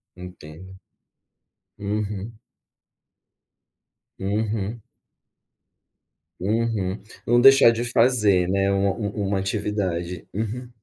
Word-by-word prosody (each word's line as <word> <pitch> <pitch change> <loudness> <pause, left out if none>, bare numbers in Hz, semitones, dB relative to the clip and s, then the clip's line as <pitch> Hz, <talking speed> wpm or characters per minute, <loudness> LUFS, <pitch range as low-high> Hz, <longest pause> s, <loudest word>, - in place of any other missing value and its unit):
Entendo. 90 0 -11 1.0
Uhum. 105 +1 -4 1.8
Uhum. 105 +2 -2 1.6
Uhum. 105 -1 -1 0.2
Não 120 +1 +4
deixar 135 -3 +8
de 115 +1 -2
fazer, 115 -7 +3
né, 100 +1 +1
um 100 0 +1 0.3
um 100 - -1
uma 100 -1 0
atividade. 95 -4 -3
Uhum. 115 +4 -4
100 Hz, 80 wpm, -23 LUFS, 95-115 Hz, 1.8 s, deixar